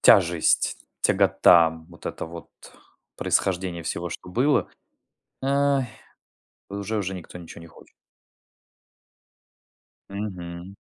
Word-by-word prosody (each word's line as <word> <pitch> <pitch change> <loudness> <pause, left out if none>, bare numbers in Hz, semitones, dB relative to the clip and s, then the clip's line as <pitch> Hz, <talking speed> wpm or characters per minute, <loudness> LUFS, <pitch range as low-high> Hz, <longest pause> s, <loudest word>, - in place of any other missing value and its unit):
тяжесть, 85 -5 +4 0.2
тягота, 85 -2 +5 0.2
вот 85 -1 -11
это - - -4
вот 85 +1 -9 0.7
происхождение 90 -2 0
всего, 85 +2 -3
что - - -8
было, 135 +8 +2 0.7
эй, 140 0 +2 0.8
уже 100 +2 -3
уже 95 -1 -2
никто 90 0 -9
ничего 85 -1 -11
не - - -11
хочет. 80 - -18 2.2
Мгм. 95 -3 -6
90 Hz, 95 wpm, -25 LUFS, 85-105 Hz, 2.2 s, тягота